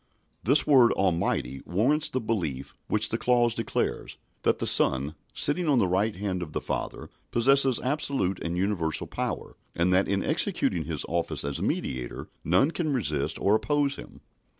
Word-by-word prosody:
This 140 +6 +4
word 130 -5 +6
"Almighty" 85 -8 0
warrants 135 - +1
the 130 - -1
belief 90 - -3
which 110 0 +1
the 115 - -2
clause 120 -2 +3
declares, 115 -1 -3 0.2
that - - +2
the - - -3
Son, 70 +3 +3 0.2
sitting 170 +4 +1
on 140 - +4
the 100 - +3
right 100 +4 0
hand 95 -1 -3
of 75 -3 -6
the - - -1
Father, - - -5 0.2
possesses 135 +1 +3
absolute 130 -9 -1
and 85 +1 -3
universal 90 -5 0
power, - - -4 0.2
and 90 +2 +2
that 95 +1 +3
in 100 -1 0
executing - - 0
His - - -3
office 85 0 -2
as 70 -1 -3
Mediator 60 -2 -3 0.2
none 95 - +3
can 165 -3 -2
resist 75 - -1
or 100 - +2
oppose 145 +4 +1
Him. - - -12
105 Hz, 165 wpm, -27 LUFS, 85-130 Hz, 0.2 s, word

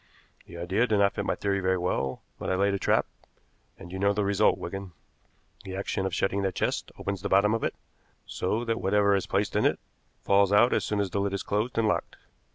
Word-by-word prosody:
The 85 - -10
idea 95 +8 +1
did 110 -2 +2
not 100 0 +3
fit - - -3
my - - +1
theory 100 -1 -1
very 95 0 +1
well, 80 -7 -2 0.2
but - - -4
I 95 - +1
laid 100 +1 +2
a 100 - -1
trap, - - +2 0.7
and 90 -2 -11
you 95 - -5
know 100 +1 +3
the 105 0 0
result, 100 0 +3
Wigan. 95 0 -6 0.7
The 95 - -6
action 95 0 -2
of 95 - -6
shutting 95 +2 0
that 95 -1 -1
chest - - -1
opens 100 -2 -4
the 100 - -3
bottom 100 +3 +4
of 115 - -1
it, - - -1 0.5
so 110 +6 -2
that 115 0 -1
whatever 100 +1 +3
is 95 - -1
placed 100 +1 -1
in - - +2
it - - +2 0.4
falls 100 0 +3
out 105 +4 +5
as - - +1
soon 105 - -1
as 95 -3 -2
the 100 - -1
lid 100 0 -1
is 100 - -2
closed 110 +5 -2
and 115 -1 +3
locked. 105 - -1
100 Hz, 235 wpm, -27 LUFS, 95-105 Hz, 0.7 s, out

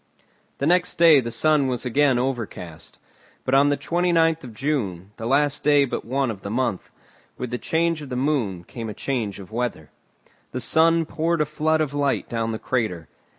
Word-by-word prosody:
The 140 - -2
next 180 +2 +2
day 165 -3 +7
the 120 -3 -3
sky 155 +6 +3
was 130 -3 -1
again 135 +1 +3
overcast; 115 -10 -5 0.5
but 130 - -1
on 140 +1 +5
the 145 - +1
29th 165 0 +1
of 120 -4 -10
June, 105 - -2
the 115 - -5
last 145 +2 +2
day 145 -1 +5
but 130 - -4
one 130 +1 -1
of 100 -3 -9
the 100 - -6
month, 115 -3 -2 0.5
with 125 -1 -5
the 125 - -3
change 165 -1 0
of 145 - -8
the 125 - -4
moon 125 - -1
came 115 +5 -7
a 105 - -7
change 115 -8 -3
of 100 0 -11
weather. 115 -10 -3 0.6
The 125 - -2
sun 165 +6 +3
poured 165 +1 -1
a 150 - +2
flood 155 +1 0
of 145 -2 -1
light 145 -1 0
down 115 -1 -2
the 110 - -3
crater. 110 -11 -2
135 Hz, 195 wpm, -23 LUFS, 115-150 Hz, 0.6 s, day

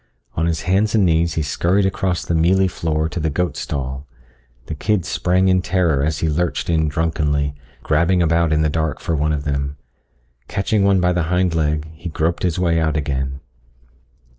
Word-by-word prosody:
On 80 +1 0
his 80 -3 -1
hands 100 +4 +1
and 105 -3 +4
knees 85 -1 +2
he 80 - 0
scurried 90 +7 +1
across 95 -2 -1
the - - -1
mealy 90 +4 +3
floor 80 -3 -1
to 85 +2 -5
the 80 0 0
goat 75 0 -1
stall. 70 -2 -4 0.6
The - - -5
kids 90 +3 -1
sprang 90 +1 +1
in 95 -1 +3
terror 85 -7 +1
as 75 0 -1
he 80 - +1
lurched 85 +2 -1
in 80 -1 +2
drunkenly, 75 -2 0 0.3
grabbing 85 +4 +2
about 85 -1 +2
in 80 0 +2
the - - +3
dark 80 -3 -1
for 85 - -2
one 75 +1 0
of 75 -2 -2
them. 70 -1 -2 0.7
Catching 100 +1 0
one 100 -2 +3
by 90 0 +2
the 85 -2 -1
hind 90 -1 +1
leg, 75 -1 0
he 85 +2 -7
groped 80 +2 -1
his 90 -3 0
way 85 -2 +2
out 80 -1 0
again. 70 -2 -3
80 Hz, 190 wpm, -20 LUFS, 75-90 Hz, 0.7 s, and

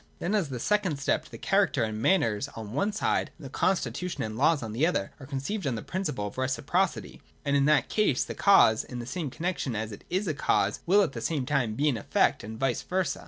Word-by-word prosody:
Then, 185 - -2
as 195 -8 +1
the 125 -2 -4
second 190 - +1
step, 150 +2 0
the - - -9
character 195 - +2
and 110 0 -3
manners 115 - +2
on 110 -2 -7
one 200 +10 +1
side 210 - 0
and - - -11
the 130 - -8
constitu 180 +1 0
tion - - -4
and 110 -1 -4
laws 150 +3 +3
on 110 - -5
the 140 +8 +2
other 100 - -1
are 135 - -10
conceived 140 +7 -3
on 130 - 0
the 110 - -5
principle 175 - -3
of 105 - -6
reciprocity: 140 +8 -1 0.2
and 140 -1 +1
in 140 -1 +3
that 150 -3 +3
case 210 - +2
the - - -6
cause 155 - +5
in 125 - -8
the 120 - -5
same 150 +3 -3
connexion 160 -4 -3
as 110 0 -3
it 100 - -10
is 185 +3 -1
a 155 - 0
cause 140 - +1
will 200 +3 +5
at 170 - -1
the 115 - -5
same 145 0 -1
time 125 -6 0
be 145 +6 +1
an 135 -6 +2
effect, 100 - +1
and 110 +2 -7
vice 135 -3 0
versa. 185 -1 -1
140 Hz, 245 wpm, -28 LUFS, 115-180 Hz, 0.2 s, cause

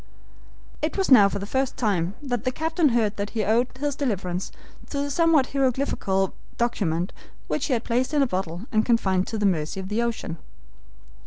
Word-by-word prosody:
It 310 +5 -1
was 385 -6 0
now 205 -6 +8
for 200 - -3
the 200 - -4
first 265 +4 -1
time 195 -5 0
that 245 -5 -2
the 255 - 0
captain 320 +2 +1
heard 225 -4 +1
that 200 0 -2
he 215 - +2
owed 230 +4 +3
his 290 -1 -1
deliverance 190 -9 -2 0.4
to 285 - -4
the 285 0 -2
somewhat 325 -3 +3
hieroglyphical 255 -8 0 0.2
document 185 -7 0 0.3
which - - -1
he 275 - +1
had 235 -1 0
placed 250 +4 0
in 295 -2 +3
a - - +3
bottle 185 -3 -3
and 215 -2 +3
confined 190 -6 +2
to 225 - -3
the 210 - 0
mercy 170 -1 0
of 190 0 -6
the 215 +3 0
ocean. 230 -8 -3
230 Hz, 190 wpm, -25 LUFS, 195-270 Hz, 0.4 s, now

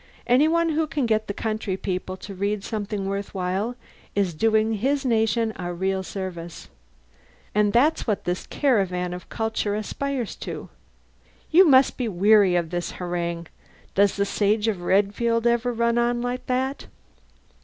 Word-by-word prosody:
Any 260 +5 +4
one 335 +1 +2
who 315 0 0
can 290 -4 -1
get 220 -1 +1
the - - -2
country 215 -3 -2
people 185 -1 -4
to 200 +1 -9
read 200 +1 -2
something 210 -2 -3
worth 200 +1 -4
while 190 +6 -1 0.4
is 195 -4 +1
doing 220 +5 +2
his 270 +6 0
nation 225 -1 +1
a 175 -1 -4
real 190 +2 -1
service. 180 -3 -7 0.8
And 210 0 +3
that's 265 +7 +2
what 210 -3 0
this 180 +1 -3
caravan 185 -10 0
of 180 0 -9
culture 220 -2 -1
aspires 250 +3 -3
to.... - - -7 0.8
You 360 +3 +7
must 265 -2 +5
be 250 - -1
weary 200 -1 +4
of 170 -2 0
this 175 -1 -3
harangue! 170 -1 -3 0.5
Does 200 0 +3
the 200 - +1
Sage 210 +2 +1
of 200 -5 -1
Redfield 205 +5 +1
ever 235 +1 +2
run 235 0 +1
on 240 0 +1
like 245 +1 -3
that?" 260 +2 -1
210 Hz, 155 wpm, -24 LUFS, 190-240 Hz, 0.8 s, You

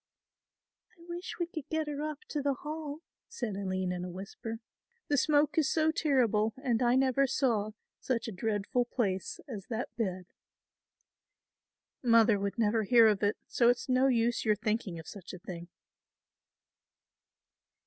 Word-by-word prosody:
"I 335 - -17
wish 345 +1 -6
we 345 - +1
could 320 -4 -8
get 315 -1 0
her 290 -1 -3
up 305 -1 -4
to 295 - -2
the 280 -1 +1
Hall," 300 +1 -6 0.3
said 225 -6 -4
Aline 185 -2 -2
in 180 0 -3
a 180 - -5
whisper, 200 +5 -7 0.5
"the 290 - +3
smoke 295 +2 +3
is 295 - +2
so 315 -1 +3
terrible 235 -9 +2
and 255 -4 0
I 245 0 +4
never 270 +1 +3
saw 220 -6 0 0.3
such 245 -3 -1
a - - -3
dreadful 220 +4 0
place 195 -6 -2
as 210 -8 -7
that 235 +1 -4
bed." 185 -5 -2 1.8
"Mother 230 -3 +5
would 200 +2 -2
never 225 0 +2
hear 230 +2 +6
of 210 -2 +3
it; 205 0 +1
so 235 -1 +3
it's 245 - +1
no 255 +1 +4
use 235 -2 +2
your 215 -1 +3
thinking 215 -4 -2
of 160 - -9
such 190 -3 -9
a - - -6
thing." 175 -1 -8
235 Hz, 160 wpm, -31 LUFS, 205-275 Hz, 1.8 s, hear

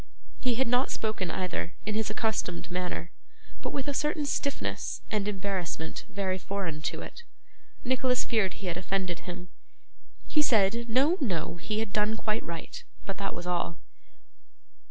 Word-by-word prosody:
He 250 -2 +2
had 260 +1 +3
not 250 +3 +4
spoken 215 -5 0
either, 160 - -1
in 215 - 0
his 215 0 +1
accustomed 210 -5 0
manner, 180 -1 -1 0.5
but - - -1
with 275 -1 -2
a 285 - +1
certain 300 +1 +1
stiffness 280 0 0
and 210 -2 +1
embarrassment 190 -5 -2
very 190 -1 0
foreign 185 -6 -2
to - - -5
it. - - -8 0.6
Nicholas 255 0 +3
feared 215 -6 +2
he 200 - -7
had 175 -1 0
offended 185 -1 0
him. 180 0 -6 0.8
He 305 - +4
said, 235 -2 +4
'No, 275 +10 +5
no, 175 - 0
he 210 +5 -2
had 225 -3 -3
done 215 +1 +3
quite 215 0 +1
right,' 165 -1 -5 0.2
but 195 - -3
that 200 - -1
was 175 - -5
all. 175 -2 0
200 Hz, 155 wpm, -30 LUFS, 180-235 Hz, 0.8 s, No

